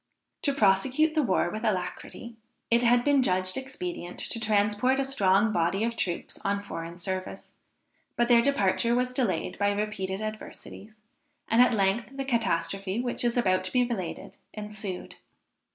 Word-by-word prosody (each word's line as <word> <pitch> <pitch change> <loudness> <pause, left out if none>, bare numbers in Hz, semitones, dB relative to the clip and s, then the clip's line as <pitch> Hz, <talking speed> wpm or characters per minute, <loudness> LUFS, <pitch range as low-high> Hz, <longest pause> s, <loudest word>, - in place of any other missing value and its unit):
To 280 - +1
prosecute 255 +9 +3
the 310 - +2
war 185 -8 +1
with 215 +1 -5
alacrity, 215 +3 -3 0.4
it 235 +1 +5
had 240 0 +4
been 285 -1 +4
judged 185 -5 +1
expedient 270 - -5
to 230 - -2
transport 215 +4 +2
a 275 - +1
strong 205 -4 +3
body 175 +3 +1
of 235 0 -1
troops 175 -6 -3
on 200 0 0
foreign 170 -4 -7
service, 185 +1 -5 0.6
but 240 - +2
their 235 -1 +6
departure 235 -2 +2
was 250 0 0
delayed 210 -13 -1
by 205 0 +3
repeated 200 -2 -3
adversities, 215 0 -8 0.5
and 225 +2 +4
at 250 -2 +5
length 215 +7 0
the 270 - -2
catastrophe 195 -4 -1
which 245 0 -1
is 240 0 +1
about 185 -6 +2
to 185 - -3
be 250 -1 +3
related 215 -8 -5 0.2
ensued. 210 -3 -6
215 Hz, 155 wpm, -27 LUFS, 190-245 Hz, 0.6 s, their